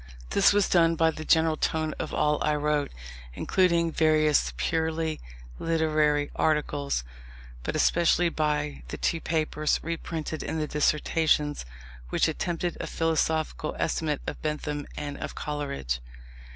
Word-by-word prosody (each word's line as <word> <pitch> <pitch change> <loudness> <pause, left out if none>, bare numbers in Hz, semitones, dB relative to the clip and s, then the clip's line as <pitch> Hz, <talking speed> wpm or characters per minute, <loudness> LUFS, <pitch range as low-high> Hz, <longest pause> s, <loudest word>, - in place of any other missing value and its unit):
This 200 - +5
was 205 0 +3
done 165 -2 +4
by 160 0 +3
the 155 0 -7
general 160 0 +3
tone 155 0 0
of - - -3
all 150 0 +1
I 150 - +2
wrote, 150 -1 0 0.4
including 170 - +2
various 155 -2 +3
purely 160 -1 -1 0.4
literary 155 -3 +1
articles, 145 - 0 0.6
but - - -3
especially 170 +1 +3
by 150 - -1
the - - -6
two 165 - 0
papers 155 -1 0
(reprinted 160 -1 -4
in - - -3
the 155 - 0
Dissertations) 150 - +1 0.4
which - - +2
attempted 175 0 -2
a - - -4
philosophical 160 -1 0
estimate 155 -3 -1
of - - -5
Bentham 150 -1 -3
and 145 -1 -5
of - - -5
Coleridge. 140 - -3
155 Hz, 130 wpm, -27 LUFS, 150-165 Hz, 0.6 s, This